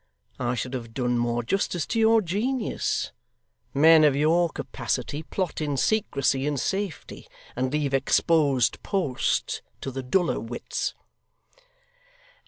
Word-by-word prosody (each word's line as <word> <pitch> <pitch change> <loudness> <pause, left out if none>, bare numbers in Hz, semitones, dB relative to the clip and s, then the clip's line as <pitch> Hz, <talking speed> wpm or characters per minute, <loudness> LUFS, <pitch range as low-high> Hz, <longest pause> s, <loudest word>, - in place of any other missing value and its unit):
I 125 -1 0
should 125 +2 -4
have 115 -3 -6
done 125 -2 0
more 120 0 0
justice 175 - -1
to 230 - -1
your 225 0 +5
genius. 220 +7 -1 0.6
Men 160 +2 +6
of 145 -3 +5
your 165 +4 +3
capacity 150 -1 -3
plot 180 +1 -3
in 145 -2 -1
secrecy 140 -9 +1
and 145 -2 -1
safety, 195 0 -4 0.3
and 130 +1 -1
leave 145 -2 -1
exposed 135 -3 +2
posts 180 -11 -1 0.2
to 135 - -5
the 135 +1 -4
duller 175 +8 +1
wits. 120 +1 -4
145 Hz, 125 wpm, -26 LUFS, 130-175 Hz, 0.6 s, Men